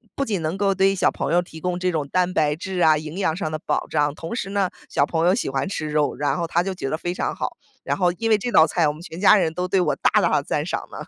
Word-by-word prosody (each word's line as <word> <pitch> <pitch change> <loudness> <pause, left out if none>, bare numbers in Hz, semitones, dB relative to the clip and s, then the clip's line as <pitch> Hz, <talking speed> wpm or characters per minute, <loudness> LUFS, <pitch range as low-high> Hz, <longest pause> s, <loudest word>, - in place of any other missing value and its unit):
不 275 - -1
仅 205 -8 -2
能 160 +4 -2
够 195 0 +2
对 190 +1 +3
于 - - -4
小 - - +2
朋 - - -3
友 175 - +4
提 160 -2 -11
供 180 +1 -2
这 180 0 0
种 155 -4 -2
蛋 180 +4 0
白 150 -3 +2
质 185 +2 -5
啊 160 -3 +5
营 155 +3 -7
养 160 -5 +1
上 165 -4 -3
的 155 - -3
保 - - 0
障， 150 -1 0
同 165 +6 -6
时 195 -5 -4
呢， 200 -2 +1 0.2
小 140 - +1
朋 165 +2 0
友 185 - +4
喜 230 - -2
欢 135 +5 -1
吃 160 -6 -4
肉， 150 -1 0
然 145 +4 -1
后 170 - -2
他 170 +1 +1
就 195 +1 -3
觉 180 -7 -4
得 155 - -1
非 175 +1 -3
常 - - -2
好。 - - -4 0.3
然 - - -1
后 180 -2 +3
因 225 +5 -2
为 215 - +5
这 240 +4 -4
道 160 - +7
菜， 160 0 +1
我 150 - 0
们 155 - -12
全 170 -1 -9
家 205 +2 +7
人 165 -6 +1
都 180 +1 -2
对 185 0 +2
我 - - 0
大 - - +2
大 - - +2
地 - - +2
赞 - - -2
赏 - - -4
呢。 - - -9
175 Hz, 340 characters per minute, -22 LUFS, 155-190 Hz, 0.3 s, 道